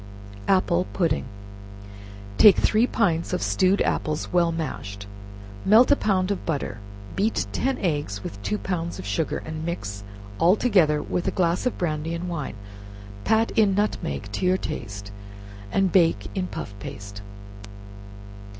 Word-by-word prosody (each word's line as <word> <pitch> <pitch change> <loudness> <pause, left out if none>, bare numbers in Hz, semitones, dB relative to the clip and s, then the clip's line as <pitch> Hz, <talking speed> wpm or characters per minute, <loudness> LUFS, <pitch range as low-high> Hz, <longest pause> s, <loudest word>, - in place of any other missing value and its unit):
Apple 185 -2 +2
Pudding. 165 -5 0 1.1
Take 205 -4 +9
three 225 +3 +3
pints 175 -9 0
of 180 - -1
stewed 190 +2 +2
apples, 155 +2 -2
well 170 -1 +3
mashed, 100 -11 -5 0.6
melt 225 +7 +6
a - - +7
pound 195 -5 +1
of 200 - -2
butter, 140 -9 -3 0.4
beat 215 +3 +1
ten 265 +1 0
eggs 145 - -2
with 100 - -7
two 100 +1 -1
pounds 170 - -3
of - - -7
sugar, 105 +10 -1
and 155 0 -5
mix 100 - -4 0.4
all 175 +4 +5
together 170 -11 +3
with 180 - -2
a - - -2
glass 175 +5 +2
of 250 - -2
brandy 160 -1 -2
and 175 +2 -4
wine; 165 -9 -4 0.7
pat 225 +1 +3
in 210 -4 +3
nutmeg 210 +1 -2
to - - -4
your 185 +1 +3
taste, 100 - -6 0.6
and 195 -2 +2
bake 165 - +3
in 185 -1 -2
puff 100 - -6
paste. 100 0 -8
170 Hz, 145 wpm, -25 LUFS, 150-190 Hz, 1.1 s, Take